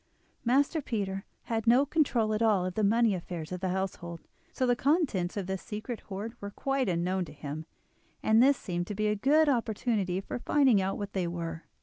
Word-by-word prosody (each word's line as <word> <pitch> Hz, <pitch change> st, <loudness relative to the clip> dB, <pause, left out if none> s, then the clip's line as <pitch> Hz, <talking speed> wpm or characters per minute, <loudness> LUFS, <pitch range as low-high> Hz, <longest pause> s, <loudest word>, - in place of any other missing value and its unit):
Master 280 Hz, +6 st, +2 dB
Peter 195 Hz, -6 st, -3 dB, 0.2 s
had 225 Hz, -1 st, -2 dB
no 250 Hz, +4 st, +6 dB
control 255 Hz, -8 st, +1 dB
at 215 Hz, -, -1 dB
all 210 Hz, -5 st, +3 dB
of 185 Hz, -, -3 dB
the 215 Hz, -, 0 dB
money 225 Hz, +1 st, +4 dB
affairs 170 Hz, -3 st, -5 dB
of 180 Hz, -, -3 dB
the 190 Hz, -, 0 dB
household, 180 Hz, -2 st, -3 dB, 0.3 s
so 260 Hz, -, 0 dB
the 245 Hz, -1 st, +3 dB
contents 255 Hz, -, +1 dB
of 200 Hz, -, -2 dB
this 190 Hz, 0 st, -3 dB
secret 220 Hz, +2 st, -5 dB
hoard 205 Hz, +4 st, -5 dB
were 200 Hz, -, -4 dB
quite 270 Hz, +2 st, -1 dB
unknown 180 Hz, +2 st, 0 dB
to -, -, -11 dB
him, 150 Hz, +1 st, -6 dB, 0.6 s
and 220 Hz, +1 st, +5 dB
this 275 Hz, +1 st, +5 dB
seemed 175 Hz, -2 st, -3 dB
to 205 Hz, -, -4 dB
be 215 Hz, +2 st, 0 dB
a 210 Hz, 0 st, +2 dB
good 295 Hz, +8 st, +4 dB
opportunity 220 Hz, -7 st, 0 dB
for 195 Hz, -, -5 dB
finding 260 Hz, -7 st, +4 dB
out 190 Hz, +1 st, -1 dB
what 205 Hz, -1 st, -5 dB
they 185 Hz, -3 st, 0 dB
were. 165 Hz, -1 st, -5 dB
210 Hz, 205 wpm, -29 LUFS, 185-240 Hz, 0.6 s, no